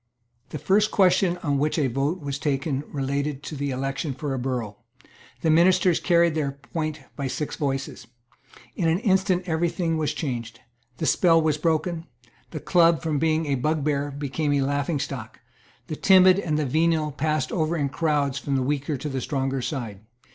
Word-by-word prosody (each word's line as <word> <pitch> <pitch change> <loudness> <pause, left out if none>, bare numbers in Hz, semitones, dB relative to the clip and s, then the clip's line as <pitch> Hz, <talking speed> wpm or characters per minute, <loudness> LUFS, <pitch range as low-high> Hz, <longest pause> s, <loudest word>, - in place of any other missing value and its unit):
The - - -5
first 205 +8 +2
question 185 -2 +3
on 140 -3 0
which 150 +3 0
a 150 - +2
vote 140 +7 -1
was 140 -1 -4
taken 140 -1 -1
related 140 0 -3
to 155 - -6
the 140 0 -2
election 135 +2 -3
for 140 +1 -3
a 130 - -2
borough. 120 -5 -3 0.6
The 160 - +2
ministers 175 +1 +4
carried 170 -2 +3
their 145 -3 -1
point 155 +2 -5
by 140 - -3
six 150 +3 -4
voices, 135 -4 -3 0.7
In 170 - 0
an 165 - +2
instant 190 -4 +2
every 170 0 0
thing 165 -2 -1
was 155 - -1
changed; 120 -6 -4 0.4
the 160 - -2
spell 165 0 +4
was 155 -2 +1
broken; 165 +1 -1 0.4
the 155 - -6
Club, 165 +2 +3
from 155 -3 0
being 160 +1 +1
a 145 - 0
bugbear, 145 +1 0
became 145 +1 -2
a 140 - +2
laughingstock; 140 -4 -3 0.5
the 155 - -5
timid 185 +2 +6
and 155 -6 -1
the 155 - 0
venal 155 +2 +1
passed 155 0 -1
over 165 0 0
in 145 -2 0
crowds 145 -2 0
from 140 -1 -2
the 130 - +1
weaker 145 +2 -1
to 150 - -5
the 135 -2 -3
stronger 135 -1 -2
side. 120 -8 -4
150 Hz, 175 wpm, -24 LUFS, 135-165 Hz, 0.7 s, timid